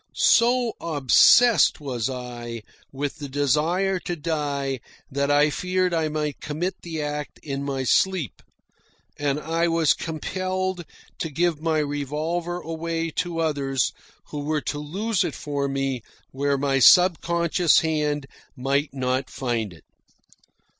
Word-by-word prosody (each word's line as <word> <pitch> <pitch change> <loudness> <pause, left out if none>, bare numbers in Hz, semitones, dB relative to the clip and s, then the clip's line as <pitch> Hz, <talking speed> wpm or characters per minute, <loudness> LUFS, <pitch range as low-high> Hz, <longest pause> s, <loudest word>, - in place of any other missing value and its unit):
So 240 0 +4
obsessed 170 - +5
was 130 -5 -2
I 120 -3 -6 0.3
with 140 +1 -4
the 145 -2 -6
desire 155 +8 +1
to 175 - -4
die 145 -4 -2 0.3
that 140 +1 0
I 145 +1 +4
feared 180 +2 0
I 160 -2 +1
might 150 -1 -3
commit 165 +5 -3
the 160 -3 -4
act 150 0 -5
in 140 -1 -4
my 135 -1 -2
sleep, 175 - +1 0.8
and 145 0 0
I 165 +2 0
was 165 -2 +3
compelled 185 +2 -3 0.3
to 165 - -2
give 165 +1 0
my 160 -1 +1
revolver 155 +4 -2
away 165 0 -3
to 175 -2 -1
others 140 -4 0 0.4
who 150 - -5
were 150 +1 -1
to 145 - -3
lose 190 +7 -1
it - - -3
for 140 -1 -2
me 135 -2 -2 0.3
where 140 +1 0
my 135 0 +1
subconscious 170 - +5
hand 150 -3 -1 0.3
might 140 +3 0
not 130 0 -1
find 120 -6 -2
it. 85 - -15
150 Hz, 135 wpm, -24 LUFS, 140-170 Hz, 0.8 s, obsessed